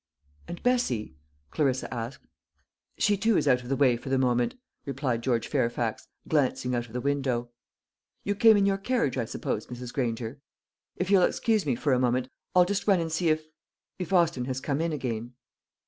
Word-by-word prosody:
"And 175 - -7
Bessie?" 130 - 0 0.4
Clarissa 135 -4 0
asked. 115 +3 -6 0.7
"She 205 -1 +2
too 220 +1 +2
is - - +1
out 125 -2 +4
of 125 - -10
the 135 - +1
way 130 -3 +4
for 125 - -8
the 135 - +2
moment," 125 -2 +1 0.3
replied 135 -4 -2
George 120 -2 0
Fairfax, 115 -1 -1 0.2
glancing 130 -4 +1
out 120 0 -1
of 110 - -16
the 125 - -2
window. 130 -4 -1 0.7
"You 205 - 0
came 220 +1 +6
in 200 - +3
your 195 0 +1
carriage, 205 - 0
I 115 - 0
suppose, 110 -1 -3
Mrs. 125 0 -7
Granger? 120 0 -2 0.6
If 185 +2 -2
you'll 195 -2 +6
excuse 215 0 +1
me 130 - +2
for 140 +3 +1
a 125 - +3
moment, 125 +1 +1 0.3
I'll 180 -1 +7
just 200 +2 -2
run 195 -3 +5
and 165 -1 -2
see 165 +1 +1
if 155 0 +1 0.5
if 180 -2 -4
Austin 170 -9 +3
has 130 0 -3
come 140 +2 -1
in 165 0 0
again." 120 -4 -4
135 Hz, 190 wpm, -27 LUFS, 120-175 Hz, 0.7 s, I'll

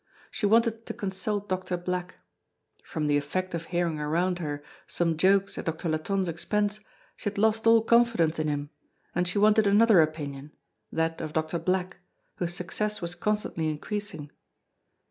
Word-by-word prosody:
She 205 - 0
wanted 230 +1 +2
to - - -5
consult 200 +1 -2
Doctor 185 -1 -2
Black. 180 0 -3 0.7
From 155 -2 -3
the 145 -1 +3
effect 185 +6 -2
of 170 0 -3
hearing 170 -3 -1
around 175 +4 0
her 145 -3 -4 0.2
some 165 -2 0
jokes 195 +4 +2
at - - -5
Doctor 165 +1 -3
Latonne's 185 +5 0
expense, 205 +5 -1 0.4
she - - -3
had 205 - -12
lost 220 +2 +2
all 225 -1 +6
confidence 225 -10 +3
in 155 - 0
him, 145 0 -2 0.4
and 175 +1 0
she 180 - -2
wanted 215 +1 +5
another 210 -2 +6
opinion, 150 -2 -3 0.4
that 165 0 -1
of 155 -1 -5
Doctor 160 +2 -1
Black, 185 0 -1 0.4
whose 175 -1 -3
success 210 +5 -2
was 170 -1 -2
constantly 175 -4 -1
increasing. 160 -1 -4
180 Hz, 160 wpm, -27 LUFS, 160-205 Hz, 0.7 s, all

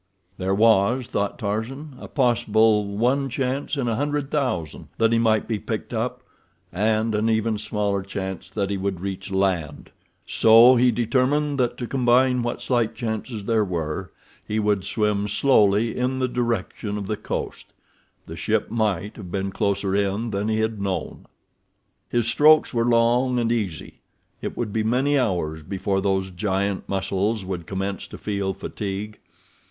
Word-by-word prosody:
There 95 +1 0
was, 115 +3 +3
thought 100 -2 -2
Tarzan, 125 +7 -4
a - - -8
possible 110 -5 +2
one 135 +4 +1
chance 135 +3 -2
in 130 -3 -1
a 115 - 0
hundred 145 0 -2
thousand 125 - -2
that 115 0 +3
he 115 - +3
might 110 -2 +2
be 110 -3 -1
picked - - -5
up, - - -2 0.5
and 110 +3 +1
an 105 +2 +1
even 110 -1 +1
smaller 105 -2 -1
chance 95 -1 -6
that 100 -2 -2
he 100 - -1
would 95 -2 -2
reach 95 +1 -5
land, 95 -6 -1 0.3
so 115 +3 +7
he 125 +1 +4
determined 130 +5 +1
that 120 -1 0
to 120 - -4
combine 125 0 +3
what 120 0 -3
slight 120 -3 0
chances 110 -1 -4
there 110 -1 +2
were, 80 -5 -3 0.3
he 105 - -3
would 105 -2 +1
swim 105 -1 0
slowly 105 -1 +3
in 125 +1 -1
the 130 -1 +1
direction 115 -4 -2
of 100 - -4
the 105 - -2
coast—the 105 - -8
ship - - -1
might 105 -3 -1
have 95 -4 -8
been 95 0 -2
closer 100 -1 0
in 100 +3 0
than 100 +1 -1
he 110 0 +1
had 110 -2 -2
known. 95 -2 -4 0.8
His 120 -2 +1
strokes 150 +6 +5
were 115 -1 +1
long 120 +2 +3
and 115 -1 +1
easy—it 100 -9 -6
would 110 -4 -3
be 110 - +1
many 130 +6 +2
hours 85 -9 -1
before 95 +3 -2
those 95 -1 0
giant 95 +1 -2
muscles 95 +2 -1
would 90 -3 -5
commence 95 0 -3
to - - -10
feel 100 -2 -2
fatigue. 100 +1 -5
110 Hz, 160 wpm, -23 LUFS, 100-120 Hz, 0.8 s, so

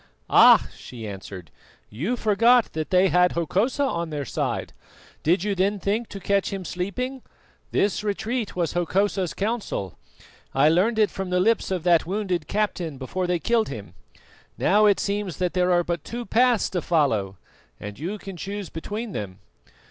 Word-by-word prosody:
"Ah!" - - +7
she 115 -3 -9
answered, 95 -4 -9 0.4
"you 170 - -2
forgot 230 +3 +3
that 155 -1 -3
they 185 +1 +4
had 180 0 +3
Hokosa 200 - 0
on 170 -11 -1
their 145 -2 -4
side. - - -3 0.5
Did 170 +3 +2
you 205 -1 0
then 195 +2 +1
think 210 +4 -2
to 200 - -7
catch 200 +1 0
him 195 -2 -5
sleeping? 250 +10 -4 0.5
This 205 +1 0
retreat 220 +2 -2
was 170 -3 -1
Hokosa's 185 +1 0
counsel. 205 - -3 0.6
I 140 +3 +5
learned 195 +8 +2
it 215 -2 +3
from 190 -1 -5
the 180 0 +1
lips 225 +4 +2
of 185 -4 -2
that 170 -2 +3
wounded 185 -5 -2
captain 180 -8 -2
before 180 +8 -3
they 180 0 +1
killed 225 +7 +1
him. - - -8 0.6
Now, 210 +1 +4
it 200 - +3
seems 200 -4 -2
that 180 -1 -1
there 180 0 +2
are 175 0 +3
but 170 -3 -3
two 240 +1 -6
paths 240 -1 +3
to 180 - -1
follow, 110 - +1 0.4
and 105 +2 -8
you 180 +8 -4
can 195 -2 -9
choose 200 +1 -5
between 210 +7 -5
them. 95 - -5
185 Hz, 170 wpm, -24 LUFS, 165-210 Hz, 0.6 s, Ah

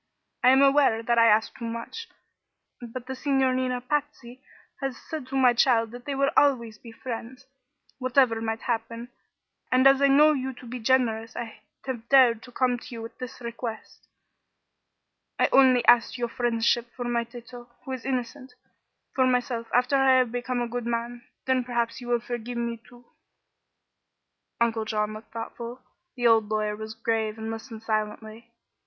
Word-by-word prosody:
I 250 - +7
am 265 +2 +6
aware 275 -5 +4
that 235 0 +2
I 230 - +6
ask 220 0 +3
too 235 - -7
much; 230 - -6 0.7
but 240 +1 -7
the 265 - -5
Signorina 260 -2 0
Patsy 265 -2 -4 0.4
has 270 -3 -3
said 310 -5 -7
to 270 - -6
my 255 -2 +5
child 230 -2 +3
that 245 0 -10
they 280 - -3
would 275 +1 +1
always 235 -7 +2
be 230 - -12
friends, 250 +2 -7 0.5
whatever 255 -3 +2
might 225 0 -3
happen, 230 0 -3 0.6
and 255 +1 +4
as 270 0 +6
I 280 - +6
know 300 +3 +6
you 265 -2 -3
to 250 - -14
be 245 +1 -6
generous 230 -2 +1
I 225 -2 -7 0.2
have 240 -3 -5
dared 250 -5 +5
to 245 - -13
come 245 0 0
to - - -14
you 230 -2 -7
with 230 - -10
this 255 0 -8
request. 235 -1 -7 1.3
I - - +3
only 255 -3 +5
ask 240 +1 +4
your 240 -1 -2
friendship 235 0 0
for 245 - -5
my 240 -1 0
Tato, 240 +1 -12 0.2
who 265 - -6
is 260 -3 -5
innocent. 260 +1 -4 0.6
For 260 -1 +3
myself, 245 -2 -1
after 250 +3 +3
I 270 -1 +5
have 250 -3 +2
become 245 0 -2
a - - -3
good 240 0 -4
man, 235 +1 -4 0.2
then 260 -1 +1
perhaps 235 0 -2
you 240 - -9
will 240 -1 +1
forgive 240 0 -5
me, 235 -1 -3
too." 245 0 -17 1.5
Uncle 230 -1 +1
John 210 -1 -1
looked 215 +1 -11
thoughtful; 235 +2 -7 0.4
the 245 -1 -3
old 225 -2 +4
lawyer 215 -1 -1
was 220 +1 -8
grave 225 -1 -1
and 220 0 -5
listened 225 0 -8
silently. 215 +1 -4
240 Hz, 175 wpm, -26 LUFS, 230-255 Hz, 1.5 s, I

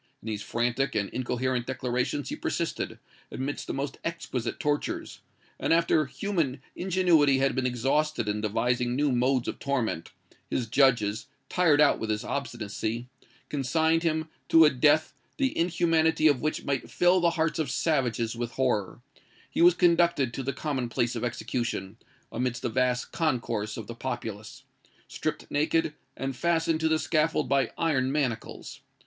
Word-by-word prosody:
In - - -19
these 105 -2 -3
frantic 120 +5 -1
and 100 -1 -1
incoherent 125 0 -1
declarations 125 +2 -2
he - - -3
persisted, - - -3 0.3
amidst 135 +2 -4
the - - -3
most 135 0 -4
exquisite 130 -8 -3
tortures; 145 0 -2 0.4
and - - -1
after 165 -2 +3
human 160 -6 -2 0.2
ingenuity 175 -7 +3
had 135 0 +2
been 130 -1 0
exhausted 135 +1 0
in 105 0 -1
devising 120 +3 0
new 145 +1 +2
modes 125 0 +1
of - - -4
torment, 125 - -1 0.4
his 125 - -1
judges, 115 -3 +2 0.2
tired 165 -5 +3
out 150 -1 +5
with 110 - -4
his 105 0 -1
obstinacy, 115 -2 -4 0.4
consigned 160 +4 +1
him 160 -1 0 0.2
to 160 -1 +8
a 150 - +5
death, 150 +4 +3 0.2
the 270 -2 0
inhumanity 165 -2 +2
of 145 -4 +3
which 155 - -2
might 140 -2 -2
fill 180 +1 +4
the 170 -1 +3
hearts 160 -1 0
of 155 -5 -1
savages 125 -5 0
with 120 0 -4
horror: 120 -7 -1 0.5
he - - 0
was 175 0 +7
conducted 170 -8 +3
to - - -3
the 135 +1 -2
common 135 -3 -3
place 120 +1 0
of 115 - -3
execution, 120 -4 -3 0.3
amidst 125 +1 -2
a - - +1
vast 125 +1 0
concourse 115 -9 -1
of 110 - -6
the 115 - -7
populace; 115 -4 -6 0.4
stripped - - -3
naked, 155 +1 +1 0.2
and 135 -1 -3
fastened 165 +2 +1
to 160 - +1
the 160 0 +3
scaffold 155 0 +1
by 140 0 +2
iron 135 -6 +1
manacles. 130 -6 -3
135 Hz, 155 wpm, -27 LUFS, 120-160 Hz, 0.5 s, to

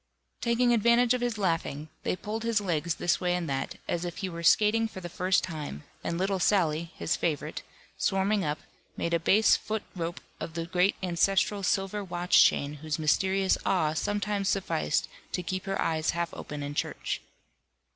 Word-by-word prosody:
Taking 240 +1 +3
advantage 235 +2 +4
of 250 - -1
his 240 -2 -1
laughing, 165 -5 -1
they - - -1
pulled 215 +4 -4
his 230 -2 +1
legs 170 -4 -1
this 175 - +1
way 180 -1 +1
and 175 -2 -2
that, 135 -1 -2
as 175 0 -1
if 175 -1 -5
he 190 - -3
were 170 -1 -6
skating 215 +6 +4
for 205 - -9
the 175 -1 -7
first 185 +2 +1
time, 150 - -5 0.2
and 170 - -2
little 190 +1 0
Sally 170 -4 +2
(his 160 - 0
favourite) 155 -4 -2 0.4
swarming 195 +1 +1
up, 150 -1 -1 0.4
made 170 - -1
a 170 - +3
base 210 +6 +5
foot 220 0 -3
rope 170 -1 -3 0.2
of 160 - -6
the 165 -1 -2
great 180 +3 +2
ancestral 195 +3 +2
silver 195 +2 0
watch 175 -1 +4
chain 140 +1 +2
whose 155 -1 -2
mysterious 190 +5 +2
awe 160 -5 +2
sometimes 205 +2 -1
sufficed 75 - 0 0.3
to 180 - -1
keep 185 +2 -3
her 195 0 -2
eyes 160 0 0
half 170 0 -1
open 145 -1 -6
in 145 0 -4
church. - - -2
180 Hz, 180 wpm, -28 LUFS, 165-205 Hz, 0.4 s, base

